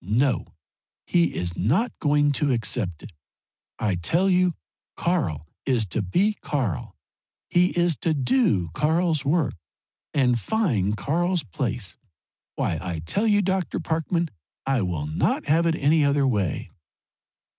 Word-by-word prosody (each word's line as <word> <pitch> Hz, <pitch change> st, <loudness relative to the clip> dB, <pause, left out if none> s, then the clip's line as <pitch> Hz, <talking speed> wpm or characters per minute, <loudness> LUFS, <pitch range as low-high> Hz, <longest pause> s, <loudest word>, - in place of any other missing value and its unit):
No 115 Hz, +3 st, +1 dB, 0.6 s
he 170 Hz, -1 st, +2 dB
is 85 Hz, -1 st, -2 dB
not 180 Hz, -, +1 dB
going 145 Hz, -1 st, +3 dB
to 145 Hz, 0 st, +1 dB
accept 105 Hz, -8 st, -1 dB
it! -, -, -10 dB, 0.7 s
I 105 Hz, -3 st, 0 dB
tell 170 Hz, -, +1 dB
you 180 Hz, -1 st, +3 dB, 0.4 s
Karl 115 Hz, -, -1 dB, 0.2 s
is 125 Hz, -5 st, +1 dB
to 110 Hz, -, -1 dB
be 185 Hz, -, +1 dB
Karl 125 Hz, -, -2 dB, 0.6 s
he 180 Hz, +1 st, +5 dB
is 170 Hz, -4 st, +2 dB
to 160 Hz, -2 st, 0 dB
do 135 Hz, -, +2 dB
Karl's 160 Hz, -, +1 dB
work 145 Hz, -3 st, +1 dB, 0.6 s
and 125 Hz, -5 st, +2 dB
find 115 Hz, -, 0 dB
Karl's 175 Hz, +5 st, 0 dB
place. 110 Hz, -, -3 dB, 0.6 s
Why 80 Hz, -, -1 dB
I 90 Hz, -3 st, -4 dB
tell 205 Hz, -, 0 dB
you, 205 Hz, -1 st, +4 dB
Dr. 190 Hz, -2 st, -1 dB
Parkman, 165 Hz, +1 st, -1 dB, 0.3 s
I 135 Hz, -3 st, +1 dB
will 85 Hz, -6 st, -2 dB
not 75 Hz, +1 st, 0 dB
have 165 Hz, +3 st, +3 dB
it 165 Hz, -, +2 dB
any 150 Hz, +1 st, +3 dB
other 140 Hz, 0 st, +3 dB
way!" 100 Hz, -, -1 dB
145 Hz, 135 wpm, -24 LUFS, 105-175 Hz, 0.7 s, he